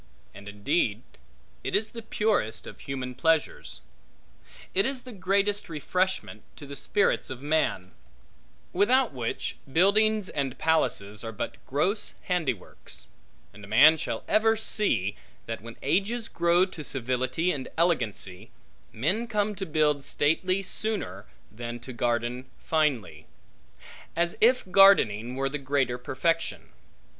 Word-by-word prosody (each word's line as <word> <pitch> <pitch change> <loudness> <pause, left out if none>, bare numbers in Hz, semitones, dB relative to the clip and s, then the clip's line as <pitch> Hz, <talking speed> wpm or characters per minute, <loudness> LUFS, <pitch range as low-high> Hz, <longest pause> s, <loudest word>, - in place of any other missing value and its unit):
And 100 +1 -10
indeed 110 +1 0 0.6
it - - -1
is 215 +2 +1
the 230 - -7
purest 210 - +1
of - - -10
human 130 -2 -5
pleasures. 160 +3 0 0.9
It 195 - +3
is 265 +2 -2
the 255 - -10
greatest 200 +1 0
refreshment 185 +4 -2
to 145 - -11
the 140 0 -8
spirits 200 +6 +1
of 130 0 -7
man; 145 -12 0 0.8
without 245 - +3
which, 120 -3 -3
buildings 210 +5 +3
and 135 -5 -3
palaces 105 -11 +1
are 115 - -5
but 105 - -6
gross 180 - 0
handiworks; 150 - -4 0.5
and 105 - -14
a - - -10
man 140 +10 +7
shall 160 - -4
ever 225 +1 +3
see, 120 - +1 0.3
that 115 0 -5
when 115 +1 -10
ages 210 - 0
grow 170 +2 +3
to 180 -5 -9
civility 130 +6 0
and 135 -5 -4
elegancy, 125 - 0 0.4
men 190 - 0
come 210 -2 0
to 195 -1 -5
build 150 -2 +1
stately 185 +8 +1
sooner 195 - -2 0.2
than 120 +2 -6
to 125 +2 -9
garden 120 +2 -1
finely; 130 - -1 0.9
as 170 +1 0
if 250 +3 +5
gardening 125 - +5
were 135 +1 0
the 150 +2 -3
greater 135 -3 0
perfection. 165 +6 -1
150 Hz, 130 wpm, -27 LUFS, 120-195 Hz, 0.9 s, man